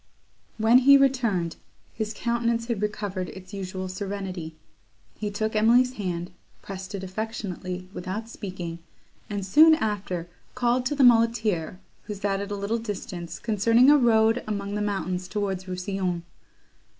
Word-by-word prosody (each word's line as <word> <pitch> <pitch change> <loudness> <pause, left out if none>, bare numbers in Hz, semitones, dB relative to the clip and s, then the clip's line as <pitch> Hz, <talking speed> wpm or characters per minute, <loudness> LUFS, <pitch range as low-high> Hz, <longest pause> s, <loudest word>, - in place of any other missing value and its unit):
When 225 +3 +6
he 280 +2 +8
returned, 235 -11 +1 0.4
his 220 -1 -3
countenance 235 0 0
had 230 -4 -2
recovered 205 -3 -3
its 190 +1 -11
usual 185 -1 -4
serenity; 185 -4 -5 0.6
he 210 - -4
took 215 +2 -2
Emily's 240 +4 +4
hand, 180 -5 -4 0.3
pressed 190 +1 -7
it 190 - -5
affectionately, 185 -3 -5
without 195 +5 -5
speaking, 180 -6 -6 0.5
and 200 -2 -3
soon 315 +11 +7
after 195 - -2 0.3
called 250 0 +1
to 290 - -1
the 280 - +3
muleteer, 225 -8 +3 0.3
who 210 - -5
sat 195 0 -1
at 200 - -5
a 205 - -2
little 200 +3 -1
distance, 195 -5 -6
concerning 230 +4 +4
a 295 - +7
road 225 -1 +4
among 200 -1 -3
the 210 - -1
mountains 185 -3 -2
towards 195 -2 -2
Rousillon. 185 -1 -2
205 Hz, 140 wpm, -26 LUFS, 185-230 Hz, 0.6 s, he